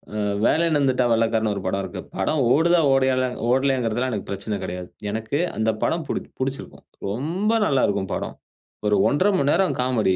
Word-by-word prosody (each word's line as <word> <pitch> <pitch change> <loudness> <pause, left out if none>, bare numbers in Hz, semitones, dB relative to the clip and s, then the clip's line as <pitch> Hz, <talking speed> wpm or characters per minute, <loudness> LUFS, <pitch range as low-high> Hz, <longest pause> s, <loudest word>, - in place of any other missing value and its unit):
அ - - -2 0.3
வேலையின்னு 160 -2 +3
வந்துட்டா 130 -2 +2
வெள்ளக்காரன் 110 -1 +2
ஒரு 100 - -4
படம் 100 +1 0
இருக்கு. - - -6 0.2
படம் 155 - 0
ஓடுதா 170 +5 +4
ஓடயலாங் 130 -1 +1
ஓடலேங்கிறதுலாம் 130 -2 +1
எனக்குப் 105 -4 -5
பிரச்சனை 100 +2 -3
கிடையாது. 90 0 -5 0.2
எனக்கு 110 +6 -2 0.2
அந்தப் 110 0 0
படம் 165 -2 0
பிடிச்சு - - -4
பிடிச்சிருக்கும். 135 +1 -5 0.2
ரொம்ப 160 - -1
நல்லா 135 -8 +2
இருக்கும் 100 -2 -2
படம். - - -3 0.5
ஒரு 105 - +3
1:30 185 +8 +2
மணி 140 -3 +1
நேரம் 190 +2 +2
காமெடி. 115 -7 +1
125 Hz, 165 wpm, -23 LUFS, 110-140 Hz, 0.5 s, ஓடுதா